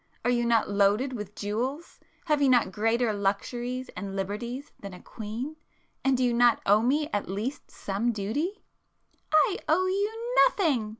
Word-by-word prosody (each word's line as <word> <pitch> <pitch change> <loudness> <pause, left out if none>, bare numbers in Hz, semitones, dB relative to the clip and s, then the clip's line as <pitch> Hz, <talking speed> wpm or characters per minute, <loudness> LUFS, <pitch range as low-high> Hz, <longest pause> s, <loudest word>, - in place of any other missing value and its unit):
Are 245 - +3
you 240 -1 +1
not 230 -2 +3
loaded 205 +6 +2
with 210 -3 -7
jewels?—have 270 +7 -3
you 275 - +4
not 245 -6 +4
greater 225 +2 +1
luxuries 240 +6 -2
and 195 +1 -6
liberties 235 +8 -4
than 200 -2 -8
a - - -12
queen? 235 +8 -6 0.5
And 270 -1 +3
do 255 - +1
you 245 -1 +2
not 240 0 +4
owe 205 +2 +5
me 290 +6 +1
at 205 -2 -2
least 225 +9 -4
some 205 +5 -2
duty?" 235 - -3 0.7
"I 310 +5 +4
owe 355 +4 +3
you 440 +6 -2
nothing!" 290 - 0
240 Hz, 160 wpm, -27 LUFS, 210-285 Hz, 0.7 s, owe